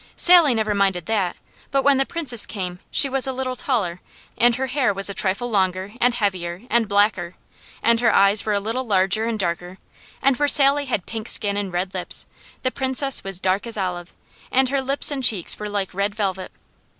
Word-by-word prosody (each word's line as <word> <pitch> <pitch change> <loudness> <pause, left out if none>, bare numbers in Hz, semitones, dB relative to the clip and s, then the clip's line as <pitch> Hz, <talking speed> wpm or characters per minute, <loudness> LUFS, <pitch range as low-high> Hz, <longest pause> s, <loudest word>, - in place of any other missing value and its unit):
Sally 345 -8 +5
never 215 -1 0
minded 195 -4 0
that, 200 -4 -1 0.3
but 275 -1 0
when 280 -1 +4
the 270 - +1
Princess 285 -10 +1
came 180 -3 -5
she 280 - +6
was 270 0 0
a - - -1
little 255 0 -4
taller, 205 -10 -2 0.3
and 240 0 +3
her 265 - -2
hair 265 -3 0
was 195 +1 0
a - - -5
trifle 200 +5 -1
longer, 190 0 -1
and 245 0 +3
heavier, 185 -3 -3
and 235 -2 +2
blacker, 200 -4 +1 0.5
and 230 0 +4
her 235 -1 +3
eyes 200 +1 +3
were 215 - -1
a 200 - +1
little 225 +6 -3
larger 200 0 +1
and 230 -1 -2
darker, 175 -1 -4 0.4
and 270 -2 +2
where 290 - +1
Sally 280 0 +4
had 225 -8 -3
pink 225 0 -6
skin 205 -2 +2
and 200 -2 -3
red 180 +2 -3
lips, 185 -1 -1 0.4
the 255 - 0
Princess 265 0 0
was 195 -2 -2
dark 190 +4 -1
as 230 - -3
olive, 180 -2 -4 0.4
and 265 0 +3
her 275 0 0
lips 275 +3 +1
and 275 -2 -3
cheeks 205 -8 +2
were 210 0 -5
like 200 -2 -3
red 200 +2 -2
velvet. 190 -3 -3
210 Hz, 205 wpm, -21 LUFS, 190-255 Hz, 0.5 s, she